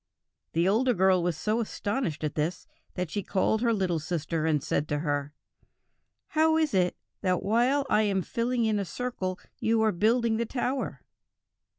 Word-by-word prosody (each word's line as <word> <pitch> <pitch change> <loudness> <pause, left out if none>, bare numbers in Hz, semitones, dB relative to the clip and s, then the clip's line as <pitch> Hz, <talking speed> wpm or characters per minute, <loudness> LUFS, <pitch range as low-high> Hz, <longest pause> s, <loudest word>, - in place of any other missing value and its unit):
The 170 +2 +2
older 240 +5 +3
girl 190 -1 +4
was 170 -2 -1
so 215 +7 0
astonished 205 - -2
at 150 - -1
this, 160 +4 -2 0.3
that 180 -3 -3
she 205 - -1
called 205 +3 +1
her 235 -1 +3
little 185 -6 0
sister 160 0 -2
and 150 -3 +1
said 150 - 0
to 145 - -1
her: 145 -2 -1 1.0
'How 320 0 +3
is 315 -5 +1
it 180 -2 +2 0.3
that 185 -2 +1
while 245 +7 +2
I 210 - +3
am 195 -3 +1
filling 235 +3 0
in 215 -1 +1
a - - 0
circle 190 -3 -3 0.2
you 225 0 +2
are 220 - +3
building 225 +4 +2
the 235 - 0
tower?' 260 +2 -2
205 Hz, 175 wpm, -28 LUFS, 175-235 Hz, 1.0 s, girl